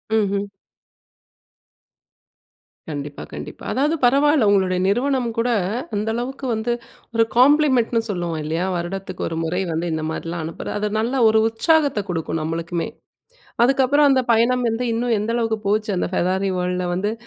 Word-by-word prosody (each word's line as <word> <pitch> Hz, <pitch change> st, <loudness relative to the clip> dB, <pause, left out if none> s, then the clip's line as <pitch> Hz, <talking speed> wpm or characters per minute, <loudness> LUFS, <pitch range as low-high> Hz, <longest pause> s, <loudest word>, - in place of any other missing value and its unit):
ம்ஹ்ம். 200 Hz, -2 st, 0 dB, 2.4 s
கண்டிப்பா. 145 Hz, -1 st, -6 dB
கண்டிப்பா. -, -, -8 dB
அதாவது 295 Hz, +5 st, +1 dB
பரவால்ல 280 Hz, -1 st, +4 dB
உங்களுடைய 190 Hz, -2 st, +2 dB
நிறுவனம் 250 Hz, +3 st, +1 dB
கூட, 240 Hz, +2 st, +1 dB, 0.5 s
அந்த 210 Hz, +2 st, -2 dB
அளவுக்கு 265 Hz, +3 st, -4 dB
வந்து 220 Hz, +2 st, -1 dB, 0.4 s
ஒரு 225 Hz, -, +5 dB
காம்ப்ளிமென்ட் 265 Hz, -3 st, +4 dB
ன்னு 225 Hz, -, +2 dB
சொல்லுவோம் 175 Hz, -4 st, -2 dB
இல்லையா? 165 Hz, +4 st, -1 dB
வருடத்துக்கு 185 Hz, +3 st, -4 dB
ஒரு 165 Hz, -, -4 dB
முறை 180 Hz, +4 st, -1 dB
வந்து 165 Hz, +2 st, -2 dB
இந்த 160 Hz, -, -2 dB
மாரிலாம் 165 Hz, 0 st, -4 dB
அனுப்புற 165 Hz, -, -6 dB
அது 210 Hz, -, 0 dB
நல்ல 235 Hz, +4 st, -1 dB, 0.2 s
ஒரு 220 Hz, 0 st, +4 dB
உற்சாகத்த 285 Hz, +1 st, +2 dB
கொடுக்கும் 165 Hz, -2 st, -2 dB
நம்மளுக்குமே. 165 Hz, +2 st, -3 dB, 0.8 s
அதுக்கப்பறம் 275 Hz, +3 st, +4 dB
அந்த 260 Hz, -1 st, +3 dB
பயணம் 240 Hz, +2 st, +2 dB
வந்து 235 Hz, +3 st, -2 dB
இன்னும் 230 Hz, 0 st, +1 dB
எந்த 210 Hz, +2 st, -2 dB
அளவுக்கு 225 Hz, -2 st, 0 dB
போச்சு 215 Hz, +1 st, +1 dB
அந்த -, -, -1 dB
ஃபெராரி 190 Hz, +2 st, +1 dB
வேர்ல்டுல 180 Hz, 0 st, -1 dB
வந்து, 205 Hz, +4 st, -1 dB
215 Hz, 145 wpm, -21 LUFS, 180-250 Hz, 2.4 s, ஒரு